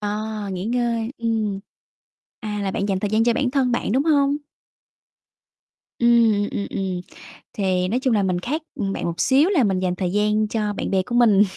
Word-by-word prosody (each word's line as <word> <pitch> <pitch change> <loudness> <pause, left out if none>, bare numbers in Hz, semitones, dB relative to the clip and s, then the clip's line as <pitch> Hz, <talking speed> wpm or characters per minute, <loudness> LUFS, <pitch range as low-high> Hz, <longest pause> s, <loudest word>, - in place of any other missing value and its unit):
À, 210 0 -3
nghỉ 185 +1 -4
ngơi, 235 0 -1
ừm. 220 -4 -1 0.8
À, 210 -2 -4
là 195 - -1
bạn 200 - -2
dành 190 -1 0
thời 205 - -2
gian 220 +2 +2
cho 235 0 +3
bản 255 0 0
thân 265 -3 +1
bạn, 235 - -1
đúng 265 +5 +2
hông? 285 -2 +3 1.6
Ưm, 230 -4 +4
ừm, 200 - -3
ừm, 190 -2 -3 0.5
thì 185 -2 0
nói 235 +6 0
chung 260 -2 +1
là 205 -2 +2
mình 180 -2 0
khác, 300 - -3
ừm, 195 -6 -2
bạn - - -4
một 170 0 -3
xíu 280 +6 +4
là 345 -10 +3
mình 190 -4 +1
dành 180 -1 -1
thời 180 -1 -2
gian 210 +1 +1
cho 210 -1 -2
bạn - - -4
bè 190 -1 +3
của 240 - -3
mình. 215 -4 +5
215 Hz, 200 wpm, -22 LUFS, 195-240 Hz, 1.6 s, mình